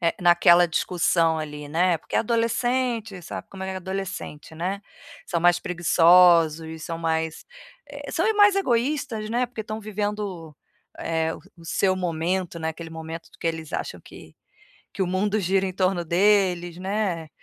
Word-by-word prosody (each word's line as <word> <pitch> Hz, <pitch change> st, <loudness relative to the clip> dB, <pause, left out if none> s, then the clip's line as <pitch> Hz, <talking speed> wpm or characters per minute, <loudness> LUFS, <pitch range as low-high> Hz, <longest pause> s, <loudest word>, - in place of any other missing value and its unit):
eh, 170 Hz, -1 st, +1 dB
naquela 175 Hz, 0 st, +6 dB
discussão 165 Hz, -1 st, +1 dB
ali, 150 Hz, -1 st, -6 dB
né, 170 Hz, +2 st, +2 dB
porque -, -, -5 dB
adolescente, 230 Hz, -2 st, 0 dB
sabe 170 Hz, -, -7 dB
como 190 Hz, -1 st, -8 dB
é 190 Hz, 0 st, -4 dB
adolescente, 185 Hz, -5 st, -6 dB
né. 185 Hz, +5 st, -3 dB, 0.5 s
São 170 Hz, -, -1 dB
mais 175 Hz, +1 st, +4 dB
preguiçosos, 165 Hz, -2 st, +4 dB
são 165 Hz, -, -4 dB
mais, 160 Hz, -1 st, -2 dB, 0.5 s
eh, -, -, -8 dB
são 345 Hz, +4 st, 0 dB
mais 410 Hz, -1 st, +6 dB
egoístas, 245 Hz, -, 0 dB
né, 240 Hz, +3 st, +1 dB
porque 240 Hz, -2 st, -7 dB
estão 215 Hz, 0 st, -5 dB
vivendo 210 Hz, 0 st, -3 dB
o 170 Hz, -7 st, -6 dB, 0.4 s
eh, 160 Hz, 0 st, -1 dB, 0.2 s
o 170 Hz, -, -15 dB
seu 185 Hz, +3 st, +1 dB
momento, 175 Hz, 0 st, -2 dB
né, 160 Hz, 0 st, -2 dB
aquele 165 Hz, +1 st, -9 dB
momento 160 Hz, +1 st, -8 dB
do -, -, -20 dB
que -, -, -4 dB
eles 160 Hz, -2 st, -3 dB
acham -, -, -4 dB
que -, -, -14 dB, 0.6 s
que 195 Hz, -, -2 dB
o -, -, +1 dB
mundo 200 Hz, +4 st, 0 dB
gira 190 Hz, 0 st, +1 dB
em 185 Hz, -, -3 dB
torno 185 Hz, -1 st, +1 dB
deles, 180 Hz, -1 st, +2 dB
né. 190 Hz, -4 st, -2 dB
180 Hz, 160 wpm, -24 LUFS, 165-205 Hz, 0.6 s, naquela